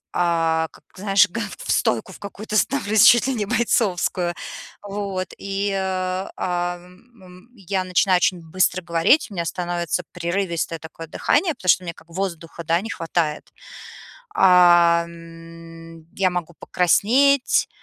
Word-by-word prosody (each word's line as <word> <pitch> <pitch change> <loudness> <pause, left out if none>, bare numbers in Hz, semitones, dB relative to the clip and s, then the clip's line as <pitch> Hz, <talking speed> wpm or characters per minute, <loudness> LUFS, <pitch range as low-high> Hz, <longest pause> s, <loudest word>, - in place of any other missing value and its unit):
а, 165 -2 +1
как, - - -20
знаешь, 195 +1 +3
га 230 +6 -4 0.2
в - - -10
стойку 115 - 0
в - - -14
какую-то 210 +1 -7
становлюсь 220 -3 +2
чуть 240 +1 +7
ли 270 - 0
не 215 -4 -2
бойцовскую! 185 -6 0 0.5
Вот, 200 -2 -4
и, 200 +1 -2
а, 185 -1 -2
о 175 -1 -2
м, 180 +7 -19
м, 180 +5 -16
я 195 -1 -3
начинаю 185 0 +2
очень 180 0 +1
быстро 185 0 +1
говорить, 170 - +2
у - - -11
меня 170 -3 -2
становится 175 0 -2
прерывистое 170 -1 -2
такое 165 +1 -10
дыхание, 330 - +1
потому 185 - -4
что 185 - +4
мне 170 -1 -5
как 160 - -19
воздуха, 170 -2 -5
да, 165 +2 +1
не 225 - -7
хватает. 165 -2 -3 0.8
А, 175 -2 +5
м, 165 -1 -13
я 190 -1 +2
могу 175 -1 -5
покраснеть. 250 +10 +2
180 Hz, 145 wpm, -22 LUFS, 170-195 Hz, 0.8 s, чуть